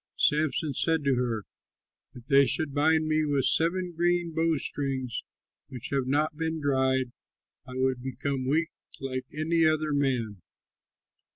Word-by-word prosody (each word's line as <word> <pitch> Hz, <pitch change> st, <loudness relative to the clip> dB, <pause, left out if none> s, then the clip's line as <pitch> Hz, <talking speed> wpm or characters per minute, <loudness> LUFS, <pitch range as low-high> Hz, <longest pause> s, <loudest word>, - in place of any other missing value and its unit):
Samson 150 Hz, 0 st, +1 dB
said 160 Hz, +3 st, +1 dB
to 140 Hz, -1 st, +2 dB
her, 120 Hz, -4 st, -1 dB, 0.7 s
"If 120 Hz, -2 st, -12 dB
they 140 Hz, 0 st, +5 dB
should 155 Hz, -3 st, -1 dB
bind 155 Hz, +2 st, +3 dB
me 155 Hz, 0 st, +2 dB
with 145 Hz, -3 st, +1 dB
seven 180 Hz, +2 st, +2 dB
green 175 Hz, 0 st, +1 dB
bowstrings 140 Hz, -6 st, -1 dB, 0.4 s
which 125 Hz, -4 st, -7 dB
have 135 Hz, -2 st, 0 dB
not 150 Hz, +3 st, +1 dB
been 160 Hz, 0 st, -2 dB
dried, 130 Hz, -3 st, +1 dB, 0.6 s
I 125 Hz, -, -8 dB
would 130 Hz, -1 st, 0 dB
become 130 Hz, +1 st, -3 dB
weak 160 Hz, +4 st, +1 dB, 0.3 s
like 130 Hz, -1 st, -4 dB
any 165 Hz, +1 st, +2 dB
other 155 Hz, -1 st, +1 dB
man." 125 Hz, -8 st, -1 dB
140 Hz, 135 wpm, -28 LUFS, 130-160 Hz, 0.7 s, they